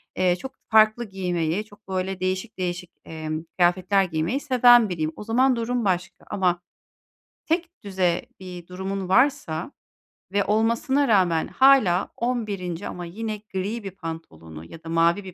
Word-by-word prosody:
eee, 180 -1 +2
çok 265 +8 -9
farklı 220 +1 +4
giymeyi, 180 -1 -1
çok 205 -1 -20
böyle 190 0 -3
değişik 185 +4 -3
değişik, 180 -1 -4
emm, 155 0 -5
kıyafetler 185 +2 +3
giymeyi 165 - -1
seven 245 -5 +5
biriyim. 160 -3 -2
O - - -8
zaman 250 +4 +3
durum 235 0 -1
başka, 185 -1 -2
ama 180 -2 0 0.8
tekdüze 200 - -1
bir 180 -2 -9
durumun 190 +1 -4
varsa 250 - +1 0.6
ve 200 +1 +2
olmasına 230 +6 +1
rağmen 180 -7 +3
hâlâ 260 -10 +4
11'inci 205 -8 -3
ama 175 -1 -6
yine 215 +5 -5 0.2
gri 205 +5 -3
bir 195 - -5
pantolonu 85 - -9
ya 165 - -13
da 165 - -8
mavi 170 +4 +2
bir 185 -1 -9
190 Hz, 140 wpm, -24 LUFS, 175-225 Hz, 0.8 s, seven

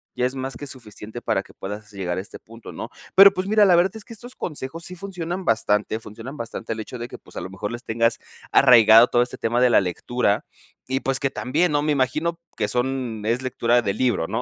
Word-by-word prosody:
Ya 125 - 0
es 130 - -6
más 130 0 -4
que 145 - -8
suficiente 115 -2 -9
para - - 0
que - - -18
puedas 105 +2 -7
llegar 95 -3 -3
a - - -2
este 100 - -9
punto, 115 +1 -12
¿no? - - -7 0.3
Pero, 195 +1 +9
pues, 185 +1 -3
mira, 210 0 +5
la 185 -3 +6
verdad 180 +4 +2
es 220 - -9
que 230 - -10
estos 245 +3 -11
consejos 155 +1 -6
sí 180 - -8
funcionan 180 -1 -5
bastante. 110 -1 +1
Funcionan 115 +7 -9
bastante 115 -1 -5
el 110 - -8
hecho 125 +3 -8
de 120 - -5
que, - - -10
pues, - - -19
a - - -3
lo 95 - -6
mejor 105 +3 -5
les 120 +1 -7
tengas 115 +1 0 0.3
arraigado 115 -1 +7
todo 120 0 +3
este 125 - -7
tema 120 +2 0
de 125 - +5
la - - +6
lectura 100 +4 -1 0.4
y, 130 +1 0
pues, 135 0 0
que 135 -1 -1
también, 155 +7 0
¿no? 145 0 +2
Me 150 - +1
imagino 155 +5 0 0.2
que 105 - 0
son 125 -4 -2
es 120 +3 0
lectura 120 -1 +2
del 100 -1 -2
libro, 120 -10 +1
¿no? 115 +2 -2
125 Hz, 240 wpm, -23 LUFS, 110-150 Hz, 0.4 s, Pero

